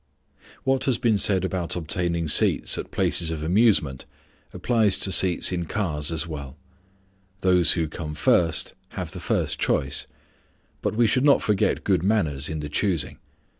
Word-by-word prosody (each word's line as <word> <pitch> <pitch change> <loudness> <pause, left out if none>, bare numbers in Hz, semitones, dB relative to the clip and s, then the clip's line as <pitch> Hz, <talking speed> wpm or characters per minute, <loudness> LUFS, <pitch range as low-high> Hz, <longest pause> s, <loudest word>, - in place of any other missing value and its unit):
What 135 0 0
has 130 -4 +1
been 110 -4 +1
said 95 -2 +3
about 90 -3 -3
obtaining 85 0 -1
seats 75 - +3
at - - -6
places 85 -2 +1
of 80 -2 -4
amusement 85 - +1 0.5
applies 110 -5 +1
to 95 - +1
seats 90 0 +3
in 90 -2 -3
cars 80 -8 -2
as 80 0 -2
well. 70 -4 -8 0.8
Those 90 -2 +4
who 80 -3 -1
come 75 0 -7
first 80 +2 +1 0.2
have - - -5
the - - -8
first - - -2
choice; 70 +1 -1 0.7
but - - -2
we 120 +1 +3
should 125 +4 +1
not 145 -1 +4
forget 105 -3 0
good - - +1
manners 80 -9 0
in 80 -1 -4
the 75 - -5
choosing. 85 0 -2
85 Hz, 160 wpm, -24 LUFS, 75-105 Hz, 0.8 s, Those